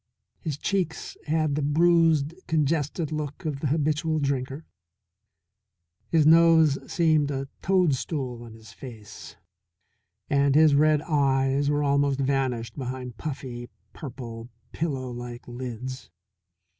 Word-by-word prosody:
His 155 -5 -4
cheeks 180 -1 -2
had 155 -1 +1
the 150 - -1
bruised 160 0 +3
congested 155 0 0
look 150 +2 -5
of 150 -3 -2
the 145 - -1
habitual 155 +2 0
drinker, 140 +1 -2 1.4
his 160 -2 +3
nose 160 -2 +6
seemed 155 -4 +2
a 135 -1 -3
toadstool 145 -8 0
on 115 -2 -11
his 110 -1 -14
face, 110 -6 -11 0.9
and 140 -1 +2
his 155 -1 +6
red 150 +1 +4
eyes 140 -2 +1
were 145 0 +1
almost 140 -1 +2
vanished 130 -4 -1
behind 125 -2 -5
puffy, 125 -5 -6 0.2
purple, 120 -4 -8 0.2
pillow 135 -6 -3
like 120 0 -8
lids. 125 +1 -6
140 Hz, 115 wpm, -26 LUFS, 130-155 Hz, 1.4 s, nose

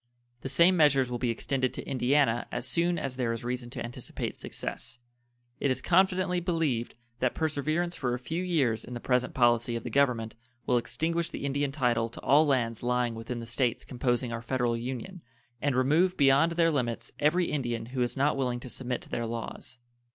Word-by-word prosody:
The 135 - -4
same 170 +7 +5
measures 140 -6 +4
will 120 - -2
be 125 -1 0
extended 130 +2 -1
to - - -6
Indiana 130 -2 +2
as 125 - -2
soon 170 +3 +1
as 135 -4 -3
there 120 -3 0
is 115 - -6
reason 125 0 -3
to 120 - -5
anticipate 120 - -5
success. - - -4 0.6
It 140 - +1
is 130 0 0
confidently 185 +1 +2
believed 165 -9 -1 0.2
that 130 -1 +1
perseverance 160 +3 -1
for 125 -3 -1
a - - -3
few 160 +8 -3
years 140 -11 +1
in 125 - -8
the - - -4
present 125 +1 0
policy 120 -1 +3
of 115 - -4
the 120 - -5
Government 120 -4 +2 0.3
will 125 -1 +3
extinguish 165 +7 -1
the - - -5
Indian 140 0 0
title 120 -5 +1
to 115 - -10
all 150 +3 +5
lands 120 -5 +1
lying 125 -1 +1
within 115 +1 -5
the - - -6
States 120 0 0
composing 120 -1 -1
our 115 - -4
Federal 120 0 0
Union, 130 +10 -5 0.4
and 140 -2 +1
remove 160 +9 +3
beyond 140 +4 +5
their 165 -1 +3
limits 120 -6 -2
every 175 +4 +2
Indian 120 -6 -2
who 130 - -1
is 120 +2 0
not 140 +2 +2
willing 125 -3 -1
to 125 - -9
submit 125 0 -3
to - - -16
their 120 -1 -2
laws. 115 +3 -6
130 Hz, 195 wpm, -29 LUFS, 120-150 Hz, 0.6 s, same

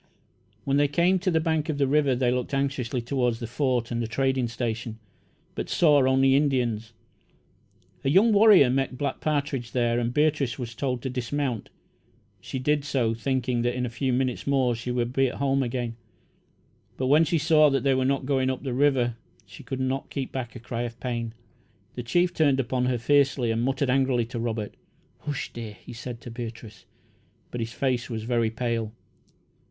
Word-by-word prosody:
When 140 0 +1
they 145 0 +4
came 175 +6 +2
to 185 +1 0
the 165 -2 +2
bank 160 -1 0
of 150 - -1
the 140 - +2
river, 140 -1 +2
they 125 -1 +1
looked 125 +3 -2
anxiously 135 -3 -1
toward 125 -1 0
the 115 - -6
Fort 120 0 -1
and 120 0 -1
the 115 - -2
trading 130 +2 0
station, 115 -1 -4 0.6
but - - -5
saw 150 -5 +4
only 135 0 +4
Indians. 120 -6 0 1.1
A 135 - +1
young 200 +9 +5
warrior 200 - +7
met 135 -1 -1
Black 140 -1 -2
Partridge 140 -5 -1
here, 120 -1 +1
and 120 0 -1
Beatrice 150 -2 +1
was 120 -3 -5
told 125 0 -2
to 130 - -2
dismount. 125 -1 -2 0.7
She - - -6
did 145 +2 +1
so, 130 -5 0
thinking 125 0 -1
that 120 +1 0
in 125 0 -1
a 120 - -5
few 130 +2 -1
minutes 125 0 -1
more 130 -3 +2
she 120 +2 -5
would 120 0 -1
be 135 0 +3
at 125 - -5
home 135 -1 +1
again, 120 -2 -3 1.0
but 130 - -1
when 145 +5 +5
she 165 +1 +1
saw 155 0 +5
that 135 -3 0
they 135 -1 +3
were 130 0 +1
not 135 0 0
going 130 -1 +1
up 130 0 -3
the 130 -3 -3
river 125 -3 +2 0.3
she 100 - -13
could 130 - -5
not 130 +1 -2
keep 135 -2 -4
back 125 -3 -5
a - - -7
cry 120 0 -4
of 120 -1 -5
pain. 115 -2 -3 0.6
The 125 - -5
chief 175 +9 +1
turned 145 -5 +3
upon 125 0 0
her 125 -1 +1
fiercely, 135 -1 +2
and 115 +1 0
muttered 130 +1 0
angrily 130 -3 +2
to 120 - -4
Robert. 115 -3 -3 0.5
"Hush, 145 -3 -4
dear!" 115 -3 -6
he - - -12
said 120 0 -7
to 120 - -9
Beatrice, 115 -3 -8 0.7
but 120 - -4
his 115 0 -3
face 130 -3 -1
was 110 -2 -4
very 115 -1 +1
pale. 115 -1 -2
130 Hz, 195 wpm, -26 LUFS, 120-140 Hz, 1.1 s, warrior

